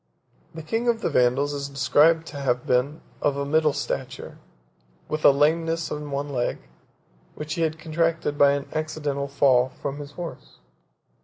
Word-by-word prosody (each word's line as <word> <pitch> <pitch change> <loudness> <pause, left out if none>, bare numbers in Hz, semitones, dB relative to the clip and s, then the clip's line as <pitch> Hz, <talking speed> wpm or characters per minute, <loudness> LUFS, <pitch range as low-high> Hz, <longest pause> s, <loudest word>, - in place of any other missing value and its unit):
The 160 - -7
king 225 +10 -2
of 230 -1 +1
the - - -1
Vandals 130 +4 +2
is 140 -1 -4
described 150 +4 +3
to 145 - -8
have 125 -3 -1
been 135 +5 0 0.2
of 145 -1 +1
a 140 - -2
middle 155 +1 +3
stature, - - -5 0.7
with 155 0 -3
a - - +9
lameness 165 +3 +1
in 150 0 -5
one 140 +1 -3
leg, 125 -3 -1 0.8
which 150 0 -5
he 165 - -3
had 160 -1 0
contracted 160 -1 -1
by 140 -1 +5
an 140 -1 -3
accidental 150 -3 -2
fall 130 -2 +3
from 140 +2 -6
his 145 0 -9
horse. 170 +1 -8
145 Hz, 165 wpm, -24 LUFS, 140-160 Hz, 0.8 s, a